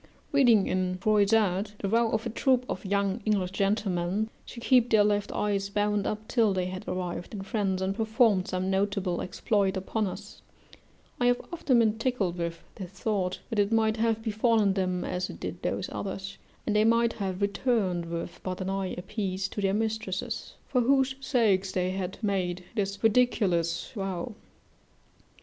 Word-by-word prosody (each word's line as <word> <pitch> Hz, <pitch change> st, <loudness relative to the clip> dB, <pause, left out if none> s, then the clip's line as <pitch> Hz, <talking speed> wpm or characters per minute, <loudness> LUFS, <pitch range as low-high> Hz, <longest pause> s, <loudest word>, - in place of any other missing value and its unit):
Reading 240 Hz, -8 st, +5 dB
in 185 Hz, 0 st, -1 dB
Froissart 205 Hz, 0 st, +2 dB
the 200 Hz, -, -2 dB
vow 230 Hz, +3 st, +3 dB
of 220 Hz, +1 st, -1 dB
a 235 Hz, -, -2 dB
troop 255 Hz, +2 st, +2 dB
of -, -, -4 dB
young 200 Hz, +2 st, 0 dB
English 200 Hz, -4 st, +1 dB
gentlemen, 195 Hz, 0 st, 0 dB, 0.2 s
to 235 Hz, -, -8 dB
keep 245 Hz, 0 st, +4 dB
their 215 Hz, -2 st, +5 dB
left 205 Hz, -1 st, +1 dB
eyes 200 Hz, -1 st, -1 dB
bound 205 Hz, 0 st, 0 dB
up 215 Hz, +1 st, -4 dB
till 225 Hz, -5 st, +3 dB
they 185 Hz, -1 st, 0 dB
had 185 Hz, +1 st, -6 dB
arrived 180 Hz, +2 st, -4 dB
in 195 Hz, -, -5 dB
France 195 Hz, -3 st, -1 dB
and 190 Hz, +1 st, 0 dB
performed 220 Hz, -3 st, +2 dB
some 185 Hz, +1 st, -1 dB
notable 195 Hz, -2 st, 0 dB
exploit 195 Hz, 0 st, 0 dB
upon 205 Hz, +3 st, -1 dB
us, 205 Hz, +3 st, -8 dB, 0.8 s
I 245 Hz, -, +3 dB
have 245 Hz, 0 st, +3 dB
often 285 Hz, -7 st, +2 dB
been 220 Hz, -1 st, +3 dB
tickled 215 Hz, -8 st, -1 dB
with 170 Hz, 0 st, -3 dB
this 185 Hz, -3 st, -7 dB
thought, 195 Hz, -1 st, -2 dB
that 220 Hz, -, 0 dB
it 205 Hz, +1 st, +2 dB
might 220 Hz, 0 st, +2 dB
have 225 Hz, 0 st, +1 dB
befallen 220 Hz, -2 st, +2 dB
them 185 Hz, -2 st, -1 dB
as 180 Hz, 0 st, -2 dB
it -, -, -9 dB
did -, -, -5 dB
those -, -, -2 dB
others, 195 Hz, 0 st, -5 dB, 0.3 s
and 210 Hz, -, 0 dB
they 210 Hz, -, +5 dB
might 230 Hz, +1 st, +3 dB
have 190 Hz, -3 st, -3 dB
returned 200 Hz, -4 st, 0 dB
with 170 Hz, +1 st, -5 dB
but 185 Hz, -1 st, -4 dB
an 190 Hz, 0 st, -2 dB
eye 195 Hz, -1 st, -2 dB
a 180 Hz, -, -5 dB
piece 195 Hz, -3 st, -2 dB
to 205 Hz, -, -4 dB
their 195 Hz, 0 st, +1 dB
mistresses, 220 Hz, -3 st, -3 dB
for 250 Hz, -, +2 dB
whose 265 Hz, +1 st, +3 dB
sakes 205 Hz, -8 st, +2 dB
they 185 Hz, 0 st, 0 dB
had 190 Hz, -1 st, -4 dB
made 185 Hz, -3 st, -1 dB
this 200 Hz, -2 st, -2 dB
ridiculous 195 Hz, -8 st, +2 dB
vow. 195 Hz, -1 st, -4 dB
200 Hz, 175 wpm, -28 LUFS, 185-220 Hz, 0.8 s, Reading